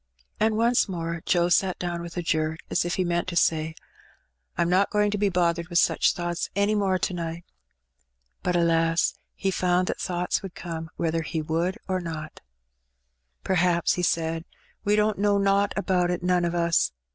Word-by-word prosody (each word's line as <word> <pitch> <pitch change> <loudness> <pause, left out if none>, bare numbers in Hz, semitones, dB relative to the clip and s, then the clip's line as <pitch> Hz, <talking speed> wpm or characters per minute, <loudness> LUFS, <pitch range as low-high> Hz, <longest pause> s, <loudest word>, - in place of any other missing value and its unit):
'^ - - -49 0.4
And. 215 0 +2
once 235 -1 +3
more 170 -2 -3
Joe 175 -1 +3
sat 185 +1 +2
down 175 -1 -3
with 170 +1 -8
a 175 - -1
jerk, 155 0 -1
as - - +1
if 175 +2 -1
he 185 - +1
meant 175 0 0
to 180 - -4
say, 160 -1 +1 0.8
'Tm 170 - +2
not 185 +3 +3
going 210 -1 +2
to 210 - -1
be 205 -1 +2
bothered 170 -2 0
with 175 -1 -1
such - - +3
thoughts 175 -1 -3
any 200 +1 +2
more 195 -3 +1
to 185 - -2
night. 170 -1 -5 1.0
But 180 - 0
alas! 165 -1 +2 0.2
he 195 - -1
found 180 0 +1
that - - -3
thoughts 180 -1 -1
would 195 -2 -8
come 165 -2 -6
whether 165 0 -1
he 160 0 -3
would 170 +6 -1
or 185 -1 -1
no. 160 -2 -5 1.2
"P^r'haps/* 175 -2 +2
he 180 - -2
said, 165 -1 0 0.4
"we 205 +1 +2
don^t 210 -1 +1
know 205 0 +3
nowt 200 0 +2
about 185 -3 +1
it, 180 0 -2
none 180 -1 +2
o* 170 0 -1
us. 170 - +2
175 Hz, 190 wpm, -26 LUFS, 170-190 Hz, 1.2 s, once